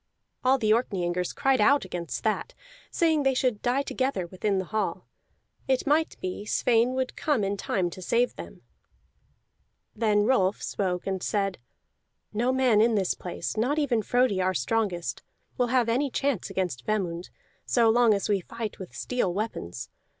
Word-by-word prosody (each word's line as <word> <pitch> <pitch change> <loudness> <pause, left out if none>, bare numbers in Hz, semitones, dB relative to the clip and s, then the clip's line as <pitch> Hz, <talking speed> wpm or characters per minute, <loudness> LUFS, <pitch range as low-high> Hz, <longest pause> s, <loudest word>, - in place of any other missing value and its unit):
All 260 +1 +4
the 215 -4 +1
Orkneyingers 180 -6 -1
cried 270 -4 +2
out 280 +2 +4
against 175 -2 -5
that, - - -1 0.3
saying 320 -3 +2
they 270 -1 +2
should 250 -5 0
die 255 +3 +1
together 260 -10 -1
within 190 +3 -1
the 190 - -1
hall; 215 +3 -2 0.6
it 260 -1 +1
might 305 +3 +1
be 185 +2 -4
Sweyn 235 +3 +2
would 260 -1 -2
come 290 -9 0
in 200 +1 0
time 185 -2 -1
to 185 - -9
save 235 +7 +1
them. - - -10 1.3
Then 210 -2 +2
Rolf 205 -5 +2
spoke 180 -3 -2
and 190 -1 -2
said: 195 -2 -1 0.7
"No 240 +4 +1
man 255 -5 +4
in 230 0 +3
this 190 -3 +1
place, 175 -1 -5
not 250 +7 +1
even 260 -7 +1
Frodi 245 -4 +2
our 185 0 +1
strongest, 180 - -1 0.3
will 245 - +1
have 245 -1 +2
any 260 +5 +1
chance 270 -6 -1
against 180 -9 -2
Vemund, 180 -5 -2 0.4
so 235 -2 +4
long 225 -1 +5
as 200 - -2
we 205 -2 +2
fight 225 +3 -6
with 190 - -9
steel 245 -7 -1
weapons. 195 - -4
220 Hz, 165 wpm, -27 LUFS, 190-255 Hz, 1.3 s, long